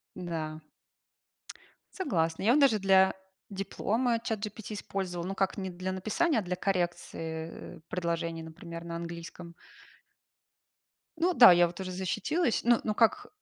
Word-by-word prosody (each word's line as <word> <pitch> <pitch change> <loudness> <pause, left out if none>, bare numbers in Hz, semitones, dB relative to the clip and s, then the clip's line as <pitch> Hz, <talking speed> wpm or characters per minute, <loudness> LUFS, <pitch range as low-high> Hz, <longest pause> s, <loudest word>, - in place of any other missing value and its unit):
Да. 160 -3 -4 1.4
Согласна. 165 - -1
Я 225 - +4
вот 295 - +5
даже 265 -7 +5
для 190 0 +5 0.4
диплома 225 +4 -1
ChatGPT 215 -1 -5
использовала. 185 -4 -4
Ну, 195 - -4
как 195 +2 0
не 190 -1 -3
для 185 +1 -4
написания, 225 - +1
а - - -1
для 180 -1 -3
коррекции, 170 -3 -2
э, - - -10
предложений, 170 -2 -2
например, 165 +1 -9
на 170 0 -6
английском. 170 0 -8 1.6
Ну 350 +2 +2
да, 240 - +10
я 175 0 +5
вот 175 +2 -10
уже 185 -1 -4
защитилась. 230 - 0
Ну 240 0 +4
ну, 215 - 0
как, 240 - +2
185 Hz, 140 wpm, -30 LUFS, 170-220 Hz, 1.6 s, да